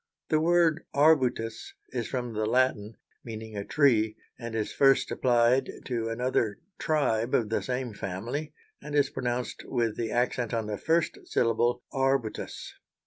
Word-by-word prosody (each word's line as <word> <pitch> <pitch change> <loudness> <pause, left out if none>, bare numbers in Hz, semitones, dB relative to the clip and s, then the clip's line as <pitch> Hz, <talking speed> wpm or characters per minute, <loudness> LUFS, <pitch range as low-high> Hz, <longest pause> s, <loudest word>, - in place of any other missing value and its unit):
The 155 - +3
word 170 -1 +3
arbutus 130 -7 +2
is 120 -3 -3
from 125 -3 -3
the 110 0 -1
Latin, 115 -3 +1 0.3
meaning 110 -2 -7
a 100 - -3
tree, 110 -6 +3 0.2
and 115 -2 -6
is 110 -2 -2
first 135 -1 +4
applied 120 +1 +3 0.2
to 115 -3 -2
another 115 -3 0 0.2
tribe 125 -7 +1
of 110 -3 +1
the 110 - 0
same 125 -2 -3
family, 115 +11 -4 0.3
and 150 - -6
is 140 -2 +3
pronounced 125 -1 -3
with 115 -3 -1
the 115 -1 -2
accent 120 0 0
on 115 -1 -1
the 105 -1 -4
first 165 0 +1
syllable 120 +1 +1
_ar_butus. 135 -4 -1
120 Hz, 145 wpm, -28 LUFS, 110-135 Hz, 0.3 s, first